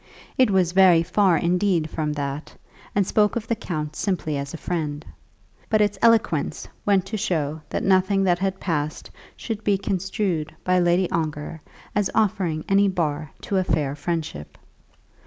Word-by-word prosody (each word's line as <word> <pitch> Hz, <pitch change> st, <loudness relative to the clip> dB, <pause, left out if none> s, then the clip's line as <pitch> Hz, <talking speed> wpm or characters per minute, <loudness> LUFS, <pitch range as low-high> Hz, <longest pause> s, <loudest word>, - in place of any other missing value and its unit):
It 255 Hz, -3 st, +4 dB
was 185 Hz, -3 st, +2 dB
very 180 Hz, -3 st, +6 dB
far 180 Hz, 0 st, +3 dB
indeed 175 Hz, -1 st, +1 dB
from 155 Hz, -1 st, -2 dB
that, 140 Hz, 0 st, -5 dB, 0.4 s
and 200 Hz, -1 st, +3 dB
spoke 210 Hz, +2 st, +2 dB
of 230 Hz, -2 st, -2 dB
the 230 Hz, -, +1 dB
count 155 Hz, -7 st, -4 dB
simply 175 Hz, -6 st, -1 dB
as 140 Hz, 0 st, -4 dB
a -, -, -6 dB
friend; 155 Hz, -3 st, -3 dB, 0.6 s
but 215 Hz, -, +3 dB
its 205 Hz, -2 st, +1 dB
eloquence 230 Hz, -1 st, +2 dB, 0.2 s
went 195 Hz, -2 st, +3 dB
to 215 Hz, +3 st, -4 dB
show 160 Hz, -6 st, -1 dB
that -, -, -2 dB
nothing 195 Hz, +1 st, +3 dB
that 175 Hz, -2 st, +2 dB
had 190 Hz, 0 st, -1 dB
passed 155 Hz, -4 st, -3 dB, 0.3 s
should 220 Hz, -2 st, -5 dB
be 200 Hz, -1 st, +2 dB
construed 190 Hz, -4 st, -2 dB
by 185 Hz, 0 st, +3 dB
Lady 175 Hz, +1 st, +3 dB
Ongar 155 Hz, -1 st, -3 dB, 0.3 s
as 205 Hz, -2 st, +1 dB
offering 185 Hz, -7 st, 0 dB
any 200 Hz, +1 st, +4 dB
bar 155 Hz, -5 st, -1 dB
to 195 Hz, -, -1 dB
a 185 Hz, -, +2 dB
fair 150 Hz, -5 st, 0 dB
friendship. 150 Hz, -, -4 dB
180 Hz, 160 wpm, -23 LUFS, 155-195 Hz, 0.6 s, very